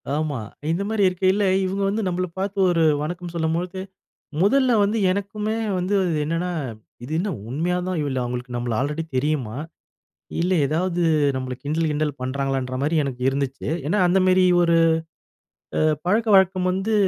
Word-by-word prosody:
ஆமா. 150 -4 -1 0.3
இந்த 175 +4 0
மாரி 220 -2 +1
இருக்கையில, 185 +3 +1 0.2
இவங்க 195 +2 -2
வந்து 210 +3 -1
நம்மள 185 0 -1
பார்த்து 200 +1 -3
ஒரு 165 -1 +2 0.2
வணக்கம் 175 +2 -5
சொல்லும்பொழுது, 170 +3 -1 0.6
முதல்ல 255 +5 +4
வந்து 210 +3 0
எனக்குமே 205 +3 -2 0.2
வந்து 185 +3 -1 0.2
இது 155 - 0
என்னன்னா, 165 +4 -1 0.5
"இது 135 - -7
என்ன 200 +4 -1 0.2
உண்மையா 165 +7 0
தான் 185 - -1
இவ 145 - -1 0.2
அவங்களுக்கு 125 0 -4
நம்மள 120 -1 -2
ஆல்ரெடி 150 +4 -2
தெரியுமா, 130 -5 -1 0.8
இல்லை 180 +2 +2
எதாவது 175 +4 -1 0.4
நம்மள 130 -1 -3
கிண்டல், 155 +3 0
கிண்டல் 150 -2 -2
பண்ணுறாங்களன்ற" 130 -1 -2
மாரி 155 +3 +1
எனக்கு 125 -2 -5
இருந்துச்சு, 135 0 -3 0.2
ஏன்னா 205 +6 +1
அந்த 190 +2 +3
மாரி 185 0 +5 0.2
ஒரு, 170 -1 +3 1.0
அ - - +2 0.3
பழக்க 220 +5 +2
வழக்கம் 185 -1 +3
வந்து, 195 +4 -1
170 Hz, 150 wpm, -23 LUFS, 145-190 Hz, 1.0 s, மாரி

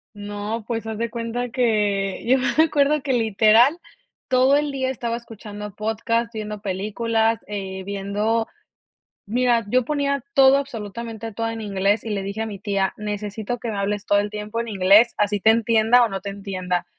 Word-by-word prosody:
No, 205 +2 -5
pues, 230 -2 -3
haz 220 0 -5
de 235 -1 -1
cuenta 235 +1 -3
que 210 -6 0
yo 260 +2 +5
me 285 +5 +3
acuerdo 295 -1 +2
que 265 -1 -1
literal, 225 - +4 0.5
todo 260 +2 +4
el 295 0 -1
día 260 -1 -1
estaba 235 -2 -3
escuchando 210 -3 -9
podcast, 230 +2 -1
viendo 210 -2 -6
películas, 220 +3 0
eh, 190 -2 -5
viendo 200 +3 -1 0.8
mira, 240 +1 +2
yo 255 +1 +2
ponía 280 -2 -1
todo 270 -1 +7
absolutamente 225 -3 -5
todo 225 +2 -2
en 225 0 -6
inglés 200 0 0
y 225 - -6
le 200 -2 -2
dije 200 +2 -5
a - - -3
mi 205 -2 -7
tía: 195 -1 -1
"Necesito 210 +2 -4
que 235 - -3
me 205 - -4
hables 200 +1 -2
todo 205 - +3
el 205 +1 0
tiempo 210 +2 -4
en 235 - -3
inglés, 205 +3 +5
así 205 0 +1
te 220 +3 +4
entienda 230 +1 +4
o - - 0
no 195 -2 -4
te 200 - -5
entienda, 185 -3 -3
220 Hz, 180 wpm, -22 LUFS, 205-235 Hz, 0.8 s, todo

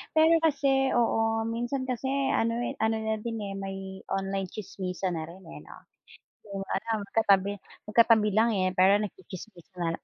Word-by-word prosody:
Pero 320 +1 +6
kasi, 270 -3 +2
oo, 225 -1 +2
minsan 240 +3 -2
kasi 255 +1 -2 0.3
ano, 230 +1 +1
eh, 240 - -2
ano 220 0 +2
na 220 0 -1
din, 230 -1 -4
eh, 200 -1 -5
may 195 0 -5 0.3
online 195 -1 -2
tsismisan 185 -3 -4
na 160 - -3
rin, 185 +3 -13
eh, 75 - -9
'no? - - -13 0.8
'Yung 195 0 -3
ano - - -2 0.2
magkatabi 200 -3 +3 0.4
magkatabi 220 -1 +5
lang, 225 +2 +4
eh, 185 -1 +1
pero 195 +3 +5
nagtsitsismisan. 180 -3 -6
210 Hz, 155 wpm, -28 LUFS, 190-230 Hz, 0.8 s, Pero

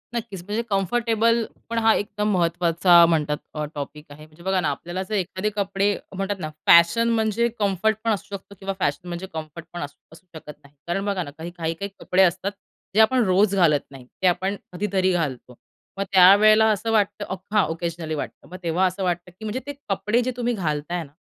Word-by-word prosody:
नक्कीच, 210 -6 -5
म्हणजे 210 +3 -1
कम्फर्टेबल 230 +3 +1 0.3
पण 230 - -3
हा 225 0 +5
एकदम 210 +1 -1
महत्त्वाचा 170 0 +4
म्हणतात 150 -1 -1
टॉपिक 150 +1 -7
आहे. 150 +1 -12
म्हणजे 155 +2 -18
बघा 190 0 +1
ना, 155 - 0
आपल्याला 175 +6 -4
जर 215 - -1
एखादे 190 +2 -1
कपडे 200 0 0 0.2
म्हणतात 195 +1 -2
ना, 155 -3 -4 0.2
फॅशन 170 +8 +6
म्हणजे 225 0 +1
कम्फर्ट 205 +2 +1
पण 230 - +1
असू 200 -1 -3
शकतो 200 +1 -11
किंवा 195 0 -3
फॅशन 160 +3 -1
म्हणजे 175 +2 -5
कम्फर्ट 160 +1 -7
पण 175 - -5
असू 145 0 -7 0.2
असू 165 - -17
शकत 150 -1 -9
नाही. 140 +1 -20
कारण 195 +3 -1
बघा 195 -3 -1
ना, 145 - -9
काही-काही 165 0 -4
काही 200 +5 -5
कपडे 190 +1 +3
असतात 185 +2 +1 0.4
जे - - +4
आपण 245 +2 +4
रोज 195 +1 +3
घालत 160 -6 +4
नाही, 130 -2 -12 0.2
ते 185 - +4
आपण 185 +3 +1 0.2
कधीतरी 190 0 0
घालतो. 130 -7 -3 0.4
मग 195 - 0
त्या 185 +1 +9
वेळेला 215 +1 +5
असं 225 +2 -1
वाटतं, 205 -1 +1
अफ 190 - -4
हां, 210 -3 +4
ओकेजनली 165 -1 -4
वाटतं, 145 - -7
मग 185 - -8
तेव्हा 170 +3 +1
असं 185 +1 -1
वाटतं 175 0 -2
की 220 +5 -11
म्हणजे 220 +5 -2
ते 285 - -5 0.2
कपडे 210 +5 +1
जे 255 +1 -1
तुम्ही 245 0 0
घालताय 170 -2 -2
ना, 140 - -15
185 Hz, 200 wpm, -23 LUFS, 170-210 Hz, 0.4 s, त्या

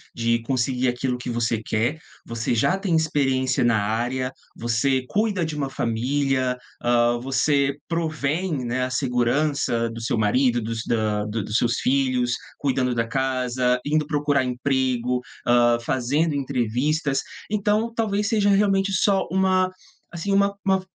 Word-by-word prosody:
de 115 0 +1
conseguir 130 0 0
aquilo 125 +1 -1
que 125 - -6
você 115 -2 -1
quer, 115 +8 -1 0.3
você 115 +1 -2
já 180 - +2
tem 195 -4 0
experiência 135 -5 +1
na 115 -3 +3
área, 120 +5 -1 0.2
você 120 +3 0
cuida 205 -3 0
de 155 -1 -4
uma 140 -2 -2
família, 130 +2 0 0.2
hã, 120 0 +2
você 140 +2 +1
provém, 160 -1 -1
né, 120 +1 -1
a - - -4
segurança 125 -1 0
do 115 0 -7
seu 115 - -1
marido, 120 +3 +2
dos 115 +1 -4
da 105 -2 0
do 105 0 -3
dos 105 +2 -1
seus 120 0 +1
filhos, 130 -2 +1 0.2
cuidando 130 -3 0
da 115 -1 +1
casa, 125 0 0
indo 150 0 +1
procurar 145 -3 +1
emprego, 125 -1 0 0.3
hã, 120 0 +4
fazendo 135 +6 0
entrevistas, 135 +2 0 0.3
então, 215 +2 +1
talvez 210 -2 0
seja 205 -1 +2
realmente 195 -1 +3
só 195 0 +2
uma, 185 0 +2 0.4
assim, 175 +3 -3
uma 200 0 +3
uma 190 -1 +2
130 Hz, 145 wpm, -23 LUFS, 120-155 Hz, 0.4 s, hã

